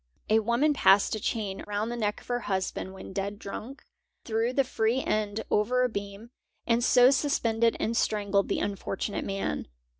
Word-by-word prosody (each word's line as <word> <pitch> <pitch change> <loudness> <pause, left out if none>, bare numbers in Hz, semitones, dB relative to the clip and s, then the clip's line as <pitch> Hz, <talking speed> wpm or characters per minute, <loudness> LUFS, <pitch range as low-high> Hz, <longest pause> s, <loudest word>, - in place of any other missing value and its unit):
A 220 - +6
woman 235 +7 +2
passed 200 -7 +4
a 215 - -2
chain 205 -3 -3
round 210 +2 -2
the - - -3
neck 210 -3 -2
of - - -19
her 245 0 -1
husband 190 -3 -3
when 190 - -9
dead 200 +1 -3
drunk, 225 +7 -8 0.4
threw 225 +1 0
the 275 +2 +2
free 240 0 0
end 215 0 -1
over 250 +5 +2
a 250 - +2
beam, 200 +2 -7 0.3
and 235 0 +2
so 250 +1 +6
suspended 235 -5 +1
and 230 - -1
strangled 205 -3 +1
the - - 0
unfortunate 200 0 -3
man. 195 - -3
220 Hz, 175 wpm, -28 LUFS, 200-240 Hz, 0.4 s, A